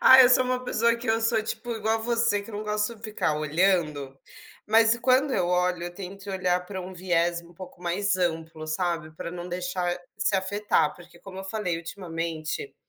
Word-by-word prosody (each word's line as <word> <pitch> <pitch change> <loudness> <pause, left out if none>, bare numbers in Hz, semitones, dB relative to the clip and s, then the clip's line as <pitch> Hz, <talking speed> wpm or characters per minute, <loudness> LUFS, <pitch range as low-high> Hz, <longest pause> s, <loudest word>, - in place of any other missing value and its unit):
Ah, 260 0 +9
eu 245 - +7
sou 255 0 +5
uma 255 0 -1
pessoa 235 -1 +2
que 235 0 -7
eu 225 +1 +3
sou, 225 0 +2
tipo, 225 +2 -5
igual 220 0 0
a - - -3
você 230 -2 +1
que 215 - -11
eu 205 - -6
não 215 - -4
gosto 210 +2 -1
de 215 - -21
ficar 190 -8 -1
olhando, 150 -4 +1 0.5
mas 225 +2 +5
quando 260 +3 +3
eu 180 -6 +1
olho, 180 -1 +1
eu 175 0 -6
tento 195 +1 -8
olhar 180 -1 0
para 190 -1 -5
um 185 +1 -7
viés 175 -1 +1
um 170 +1 -17
pouco 185 0 -11
mais 190 +3 +1
amplo, 165 -3 -2
sabe, 165 -1 -1
para 170 - -6
não 175 0 -6
deixar 180 -1 -2 0.2
se 200 - +1
afetar. 190 -4 +1
Porque, 175 0 -15
como 190 -1 -10
eu 190 - -6
falei, 195 -4 -2
ultimamente, 165 - -4
185 Hz, 205 wpm, -26 LUFS, 175-220 Hz, 0.5 s, Ah